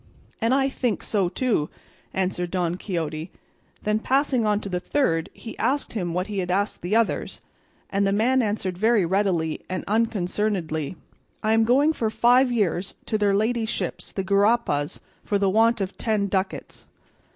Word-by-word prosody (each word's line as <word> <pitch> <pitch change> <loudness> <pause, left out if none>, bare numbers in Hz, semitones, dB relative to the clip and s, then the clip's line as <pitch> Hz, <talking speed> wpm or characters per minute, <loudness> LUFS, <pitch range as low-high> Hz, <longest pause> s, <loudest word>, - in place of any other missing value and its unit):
"And 230 +2 +2
I 270 0 +3
think 245 -5 -1
so 195 -5 +1
too," 215 - 0 0.4
answered 180 -2 -1
Don 175 -2 0
Quixote; 165 -3 -4 0.5
then 210 +1 +1
passing 260 -2 +1
on 210 -1 +2
to - - -6
the 180 -2 -2
third 170 - 0
he 225 - -9
asked 280 +2 0
him 180 -6 -2
what 180 +1 0
he 205 -1 -3
had 180 -1 -2
asked 200 +3 0
the 180 +5 -1
others, 230 -1 0 0.5
and 200 0 +2
the - - +2
man 245 +6 +3
answered 205 -5 -2
very 220 -3 +3
readily 175 -4 0
and 185 0 -3
unconcernedly, 195 -7 -1 0.5
"I 215 +1 +3
am 225 0 +4
going 280 +7 +4
for 225 -7 -1
five 245 +3 +4
years 200 -5 0
to 215 - -1
their 200 -1 +3
ladyships 215 -5 -1
the 195 - -3
gurapas 200 -7 +1 0.2
for 205 - 0
the 195 -1 +2
want 225 +3 +4
of 190 0 -3
ten 215 -3 +1
ducats." 190 -1 -3
205 Hz, 165 wpm, -24 LUFS, 180-230 Hz, 0.5 s, am